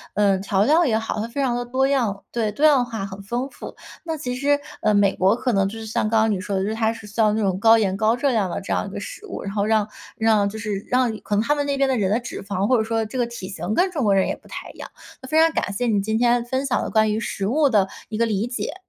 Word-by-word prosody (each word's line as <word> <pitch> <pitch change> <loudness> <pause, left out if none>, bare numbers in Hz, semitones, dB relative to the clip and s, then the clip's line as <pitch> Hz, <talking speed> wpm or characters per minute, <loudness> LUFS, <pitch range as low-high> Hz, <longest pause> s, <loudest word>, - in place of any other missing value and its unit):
呃， 200 -2 +3
调 195 0 +1
料 320 +5 +4
也 225 -6 +2
好， 225 -1 -3
它 225 - -3
非 265 +4 -3
常 245 -2 +1
地 245 - -2
多 260 +2 +1
样 230 -8 0
对， 225 -3 -1
多 285 +9 +1
样 280 -5 +5
化， 225 -4 -5
很 195 0 -8
丰 240 +6 -3
富。 - - -10 0.3
那 325 -2 -3
其 250 -4 -4
实， 285 +2 +2 0.2
呃， 210 -1 +2
美 200 -1 +4
国 190 +3 +3
可 245 0 -1
能 195 -1 +2
就 225 - -8
是 225 - -7
像 215 0 -1
刚 220 -1 +3
刚 220 -1 +2
你 190 - -1
说 200 0 -3
的， 190 - 0
就 200 - -1
是 220 - -2
它 225 0 +1
是 225 -1 -10
像 215 0 +1
那 220 - 0
种 190 -1 0
高 225 +2 +6
盐、 195 -3 +1
高 220 +3 +2
热 270 +2 +1
量 205 -6 +1
的 - - -3
这 195 - -3
样 - - -1
一 - - -6
个 - - -5
食 465 -4 -8
物， - - -6
然 200 0 -5
后 200 - 0
让 215 -1 +2 0.3
让 215 -2 +3
就 220 - -8
是 210 -2 -3
让 250 -3 +2
可 205 - -3
能 210 - +2
它 295 - +2
们 290 - -1
那 280 -1 0
边 275 0 +2
的 260 - +1
人 195 -3 +1
的 215 - +2
脂 240 - -7
肪， 200 -1 -2
或 255 - +4
者 220 - +1
说 225 0 -1
这 255 +4 -5
个 240 - +1
体 235 -6 -7
型 190 +2 -3
跟 370 +1 +2
中 300 -7 -2
国 200 -3 +3
人 190 - +2
也 - - -2
不 - - -21
太 - - -8
一 - - -20
样。 - - -8 0.3
那 260 - -10
非 315 +2 +3
常 325 0 +5
感 200 - -2
谢 245 +5 -1
你 205 -3 +2
今 220 +2 -1
天 240 0 +3
分 260 +3 -2
享 260 - 0
的 - - -3
关 215 -1 +3
于 215 - -1
食 200 -3 -3
物 290 +5 +3
的 205 -5 +3 0.2
一 215 - -4
个 230 - +2
理 215 0 -1
解。 245 +4 -4
220 Hz, 340 characters per minute, -22 LUFS, 205-250 Hz, 0.3 s, 高